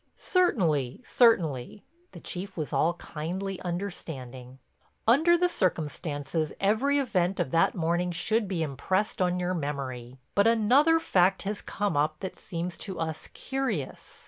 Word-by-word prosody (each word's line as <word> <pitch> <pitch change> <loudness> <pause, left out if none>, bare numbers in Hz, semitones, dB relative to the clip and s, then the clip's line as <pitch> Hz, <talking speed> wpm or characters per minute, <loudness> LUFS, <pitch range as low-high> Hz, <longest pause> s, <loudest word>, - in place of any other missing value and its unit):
"Certainly, 165 - +1
certainly." 180 - +2 0.3
The - - -9
Chief 190 +2 -6
was 155 -3 -3
all 170 +2 +2
kindly 180 +5 -5
understanding. 135 -9 -6 0.5
"Under 320 +9 +5
the 360 +1 +3
circumstances 155 - -1
every 225 +9 +2
event 190 -9 0
of 130 - -1
that 165 - +3
morning 175 +1 0
should 210 +5 0
be 180 -4 -1
impressed 185 +9 -1
on 180 0 +1
your 180 +1 -1
memory. 135 -6 -4 0.2
But 200 +2 +4
another 255 +9 +4
fact 190 - +2
has 205 +1 -3
come 200 -4 -2
up 155 +1 +1
that 190 - -6
seems 170 0 -5
to 190 - -5
us 160 -1 -3
curious. 250 - -4
180 Hz, 140 wpm, -28 LUFS, 155-210 Hz, 0.5 s, Under